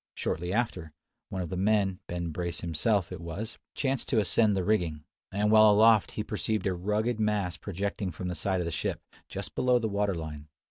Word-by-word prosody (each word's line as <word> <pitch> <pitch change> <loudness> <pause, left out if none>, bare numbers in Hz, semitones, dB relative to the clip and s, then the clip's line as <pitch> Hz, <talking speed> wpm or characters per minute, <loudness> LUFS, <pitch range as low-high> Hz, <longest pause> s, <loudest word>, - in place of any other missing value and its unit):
Shortly 90 +3 -2
after, 95 -8 -1 0.4
one 95 -1 -3
of 85 - -6
the 95 - -3
men, 95 -1 +2
Ben 85 -1 -3
Brace 85 0 -3
himself, 90 +4 0
it 90 -2 -6
was, 90 +7 -6 0.2
chanced 135 -2 -1
to 125 - +2
ascend 105 +1 +3
the 95 - 0
rigging; 85 -7 0 0.3
and 105 +2 +1
while 110 0 +8
aloft 110 0 +5
he 105 - -2
perceived 110 -1 -2
a 95 - +1
rugged 105 +6 -1
mass 105 -5 0
projecting 100 0 -3
from 90 +2 -5
the 90 - -2
side 95 +3 -1
of - - -2
the 85 - -2
ship, - - -2 0.3
just - - -6
below 125 -1 +3
the 115 -2 0
water 100 -2 0
line. 75 -2 -6
100 Hz, 200 wpm, -29 LUFS, 85-110 Hz, 0.4 s, while